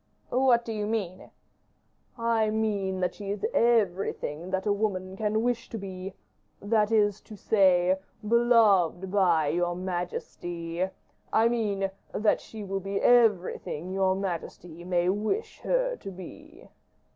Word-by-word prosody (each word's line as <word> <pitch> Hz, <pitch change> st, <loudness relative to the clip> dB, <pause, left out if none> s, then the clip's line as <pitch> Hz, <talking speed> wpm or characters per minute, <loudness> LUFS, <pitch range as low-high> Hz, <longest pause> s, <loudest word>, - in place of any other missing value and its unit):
"What 245 Hz, -2 st, +3 dB
do 225 Hz, -, -4 dB
you 210 Hz, -1 st, -2 dB
mean?" 200 Hz, -5 st, -3 dB, 0.9 s
"I 230 Hz, -2 st, +1 dB
mean 205 Hz, -4 st, -1 dB
that 180 Hz, -, 0 dB
she 200 Hz, -2 st, -8 dB
is 205 Hz, -, -2 dB
everything 195 Hz, -7 st, +1 dB
that 190 Hz, 0 st, -2 dB
woman 200 Hz, -3 st, -1 dB
can 215 Hz, +2 st, 0 dB
wish 245 Hz, 0 st, -1 dB
to 225 Hz, -, -5 dB
be 190 Hz, -1 st, -7 dB, 0.4 s
that 210 Hz, +1 st, +1 dB
is 210 Hz, -2 st, +2 dB
to 215 Hz, -, -12 dB
say, 185 Hz, -2 st, +3 dB, 0.3 s
beloved 210 Hz, -6 st, +3 dB
by 175 Hz, -7 st, +3 dB
your 175 Hz, +2 st, 0 dB
majesty; 175 Hz, -1 st, -4 dB, 0.4 s
I 225 Hz, +1 st, +4 dB
mean, 200 Hz, -5 st, -1 dB, 0.2 s
that 210 Hz, 0 st, +2 dB
she 220 Hz, -1 st, -9 dB
will 195 Hz, 0 st, -3 dB
be 195 Hz, +1 st, -3 dB
everything 190 Hz, -7 st, +2 dB
your 190 Hz, -1 st, +2 dB
majesty 175 Hz, -3 st, -5 dB
may 175 Hz, -1 st, 0 dB
wish 215 Hz, -, -1 dB
her -, -, 0 dB
to -, -, -8 dB
be." 185 Hz, -2 st, -12 dB
195 Hz, 135 wpm, -27 LUFS, 185-220 Hz, 0.9 s, I